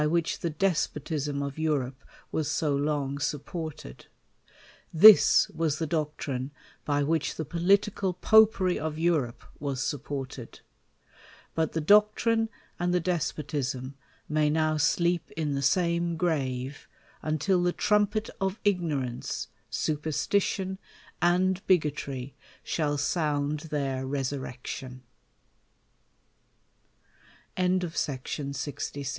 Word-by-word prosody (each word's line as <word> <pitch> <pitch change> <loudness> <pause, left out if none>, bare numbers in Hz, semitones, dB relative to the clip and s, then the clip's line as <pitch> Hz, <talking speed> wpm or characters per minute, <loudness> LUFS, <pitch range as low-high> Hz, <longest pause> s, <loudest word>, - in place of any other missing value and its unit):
"wliich 170 0 0
the 170 - -1
despotism 150 -4 -1
of 140 +2 -5
Europe 135 -4 -1 0.3
was 155 -1 -1
so 155 -2 +1
long 140 -1 -1
supported; 150 - -5 0.8
this 210 +6 +8
was 160 -2 -1
the 160 - -1
doctrine 150 -4 -2 0.4
by 145 -1 +1
which 160 +1 0
the 160 - -4
political 190 +4 +2
popery 195 -1 +4
of 155 0 -3
Europe 155 -8 0 0.2
was 140 -3 -3
supported;, 135 -3 -5 0.9
but 160 -1 0
the 165 - 0
doctrine 215 +5 +4 0.3
and 175 0 +1
the - - +4
despotism 145 -6 -2 0.3
may 150 0 +2
now 155 0 +1
sleep 170 +3 +1
in 150 -3 -1
the 140 - -1
same 170 +2 +1
grave, 140 -5 -2 0.3
until 175 +4 +1
the 175 0 +2
trumpet 210 +2 +1
of 190 +1 -1
ignorance, 155 -11 -1 0.2
super 155 0 -2
stition, 190 +4 0 0.4
and 185 +2 +2
bigotry, 140 -6 0 0.3
shall 145 -2 0
sound 150 -1 0
their 135 -3 -1
resu 130 -1 -4
155 Hz, 100 wpm, -28 LUFS, 140-175 Hz, 0.9 s, this